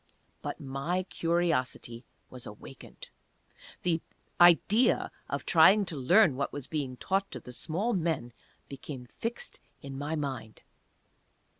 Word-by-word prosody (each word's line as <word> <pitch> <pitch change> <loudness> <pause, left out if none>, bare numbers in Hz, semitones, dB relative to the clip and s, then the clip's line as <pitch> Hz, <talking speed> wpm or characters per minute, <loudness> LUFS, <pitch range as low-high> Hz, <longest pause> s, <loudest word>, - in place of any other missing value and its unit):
But - - -5
my 145 +7 -2
curiosity 165 -9 -1 0.3
was 125 -2 -8
awakened. 105 +5 -11 0.7
The 170 -2 +1 0.4
idea 175 - +5 0.2
of - - -3
trying 205 +1 +6
to 170 - -5
learn 160 +4 +5
what 140 +1 -2
was 145 -3 -6
being 140 -4 -3
taught 195 +7 0
to - - -6
the 125 - -11
small 190 - -1
men 160 -9 -1 0.3
became 135 -2 -8
fixed 230 +1 -4 0.2
in 140 -1 -7
my 150 +3 -2
mind. 130 -7 -5
155 Hz, 125 wpm, -30 LUFS, 130-180 Hz, 0.7 s, trying